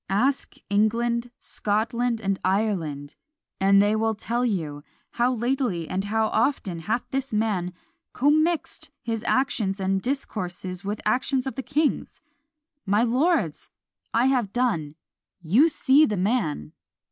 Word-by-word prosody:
Ask 255 Hz, +8 st, 0 dB
England, 235 Hz, +4 st, +1 dB
Scotland, 230 Hz, +2 st, -1 dB
and 195 Hz, -2 st, -1 dB
Ireland 175 Hz, -8 st, -1 dB, 0.5 s
and 195 Hz, +1 st, +5 dB
they 205 Hz, +2 st, +3 dB
will 220 Hz, 0 st, 0 dB
tell 235 Hz, +3 st, -2 dB
you! 160 Hz, -11 st, -2 dB, 0.3 s
How 245 Hz, +1 st, +1 dB
lately 240 Hz, -, -1 dB
and 190 Hz, +2 st, -2 dB
how 220 Hz, +1 st, +1 dB
often 220 Hz, -7 st, 0 dB
hath 220 Hz, +8 st, -1 dB
this 270 Hz, 0 st, -2 dB
man 210 Hz, -5 st, 0 dB, 0.4 s
commixed 310 Hz, +5 st, +1 dB
his 225 Hz, -2 st, -3 dB
actions 215 Hz, -7 st, +1 dB
in 190 Hz, 0 st, +1 dB
discourses 190 Hz, -7 st, -4 dB
with 205 Hz, +1 st, -3 dB
actions 255 Hz, +4 st, +1 dB
of 265 Hz, -, -3 dB
the 265 Hz, -, -4 dB
king's! 285 Hz, +4 st, -1 dB, 0.6 s
My 205 Hz, +3 st, +2 dB
lords! 275 Hz, +9 st, +1 dB, 0.4 s
I 235 Hz, +2 st, +2 dB
have 250 Hz, -7 st, +1 dB
done 185 Hz, -13 st, -1 dB, 0.4 s
you 210 Hz, -, +4 dB
see 295 Hz, 0 st, +4 dB
the 210 Hz, -, -2 dB
man! 180 Hz, -, -1 dB
220 Hz, 130 wpm, -25 LUFS, 195-250 Hz, 0.6 s, and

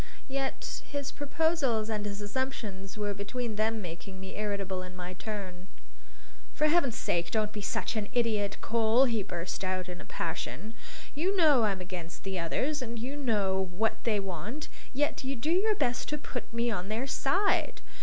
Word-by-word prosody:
Yet 270 Hz, 0 st, -2 dB
his 285 Hz, -1 st, -2 dB
proposals 290 Hz, -6 st, +2 dB
and 210 Hz, -2 st, -1 dB
his 200 Hz, 0 st, -4 dB
assumptions 205 Hz, -4 st, -3 dB
were 205 Hz, -1 st, 0 dB
between 220 Hz, +3 st, -3 dB
them 220 Hz, 0 st, +1 dB
making 180 Hz, +3 st, -7 dB
me 190 Hz, 0 st, -7 dB
irritable 200 Hz, -3 st, -1 dB
in 185 Hz, 0 st, -8 dB
my 180 Hz, 0 st, -5 dB
turn. 190 Hz, -2 st, -5 dB, 0.9 s
"For 305 Hz, -, +3 dB
Heaven's 300 Hz, -7 st, +4 dB
sake 170 Hz, 0 st, +1 dB
don't 215 Hz, +2 st, +1 dB
be 210 Hz, -, -4 dB
such 200 Hz, -, -1 dB
an 210 Hz, -2 st, -1 dB
idiot, 220 Hz, -5 st, +2 dB
Cole!" 230 Hz, +2 st, +5 dB
he 230 Hz, -4 st, +2 dB
burst 175 Hz, 0 st, -3 dB
out 185 Hz, -1 st, 0 dB
in 180 Hz, -1 st, -6 dB
a -, -, -10 dB
passion. 185 Hz, +6 st, -3 dB, 0.4 s
"You 370 Hz, +7 st, +1 dB
know 295 Hz, -9 st, +7 dB
I'm 195 Hz, -3 st, 0 dB
against 180 Hz, -2 st, -6 dB
the 190 Hz, -1 st, -1 dB
others, 265 Hz, -, 0 dB
and 235 Hz, -1 st, -3 dB
you 255 Hz, +5 st, -3 dB
know 200 Hz, -8 st, +2 dB
what 220 Hz, +5 st, 0 dB
they 215 Hz, -3 st, +3 dB
want, 195 Hz, -, -4 dB, 0.2 s
yet 290 Hz, +1 st, +1 dB
you 270 Hz, +1 st, -1 dB
do 265 Hz, +7 st, 0 dB
your 415 Hz, +5 st, +4 dB
best 245 Hz, -, +1 dB
to 300 Hz, -, 0 dB
put 260 Hz, -4 st, -5 dB
me 235 Hz, +1 st, +1 dB
on 195 Hz, -2 st, -2 dB
their 225 Hz, +5 st, 0 dB
side! 370 Hz, +9 st, +2 dB
220 Hz, 175 wpm, -31 LUFS, 190-265 Hz, 0.9 s, know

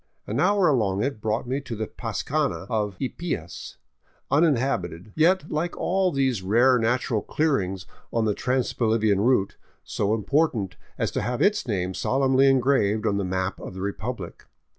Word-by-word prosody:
An -, -, -2 dB
hour 200 Hz, -3 st, +3 dB
along 105 Hz, -8 st, +1 dB
it 135 Hz, -5 st, -3 dB
brought 110 Hz, +3 st, -1 dB
me 135 Hz, +3 st, -1 dB
to 125 Hz, -4 st, -6 dB
the 110 Hz, 0 st, -3 dB
pascana 135 Hz, +7 st, -2 dB
of 105 Hz, -3 st, -1 dB
Ypias, 130 Hz, -, -5 dB, 0.5 s
uninhabited, 120 Hz, -, +1 dB
yet 165 Hz, +1 st, +2 dB
like 165 Hz, +3 st, -2 dB
all 185 Hz, 0 st, +1 dB
these 135 Hz, -, 0 dB
rare 120 Hz, +6 st, +4 dB
natural 115 Hz, -1 st, 0 dB
clearings 95 Hz, -, -1 dB, 0.3 s
on 115 Hz, -1 st, +1 dB
the 105 Hz, -, +2 dB
trans 125 Hz, +3 st, -1 dB
Bolivian 110 Hz, -4 st, +2 dB
route, 110 Hz, -4 st, +2 dB, 0.3 s
so 105 Hz, +2 st, 0 dB
important 115 Hz, -, 0 dB, 0.2 s
as -, -, -1 dB
to -, -, -2 dB
have 125 Hz, 0 st, -2 dB
its 210 Hz, -7 st, +2 dB
name 95 Hz, -4 st, -1 dB
solemnly 135 Hz, +4 st, +2 dB
engraved 125 Hz, -6 st, +2 dB
on 100 Hz, -, +1 dB
the 100 Hz, -, -1 dB
map 95 Hz, +1 st, -2 dB
of -, -, -8 dB
the 95 Hz, -, -6 dB
republic. 100 Hz, -1 st, -5 dB
120 Hz, 160 wpm, -25 LUFS, 100-140 Hz, 0.5 s, rare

